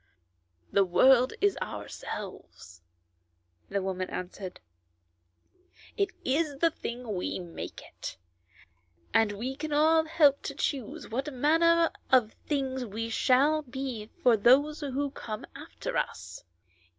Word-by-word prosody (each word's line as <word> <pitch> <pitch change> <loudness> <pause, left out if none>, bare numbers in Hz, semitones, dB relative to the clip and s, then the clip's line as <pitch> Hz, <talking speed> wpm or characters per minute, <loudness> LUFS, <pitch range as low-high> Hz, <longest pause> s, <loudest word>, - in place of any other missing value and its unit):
" 85 -1 -40
The 200 - +7
world 250 +8 +5
is 405 0 +3
ourselves," 90 - -7 0.9
the 200 -1 -1
woman 185 -1 -3
answered; 185 +1 -6 1.4
"it 400 -1 +1 0.2
is 285 +1 +1
the 330 +3 +3
thing 240 -5 -5
we 180 - -2
make 175 -2 -7
it, - - -8 1.0
and 225 -2 +4
we 245 +6 -4
can 310 +2 -5
all 315 +2 +4
help 300 -3 +4
to 280 - -5
choose 275 -5 -3
what 270 +6 -2
manner 330 +5 +4 0.2
of 245 -4 +4
thing 270 -3 -2 0.2
it 225 +1 -3
shall 280 +7 +3
be 255 -5 -5 0.2
for 245 -2 +6
those 270 +8 +4
who 280 -1 -2
come 215 -5 -6
after - - -6
us. - - -4
260 Hz, 125 wpm, -29 LUFS, 210-295 Hz, 1.4 s, The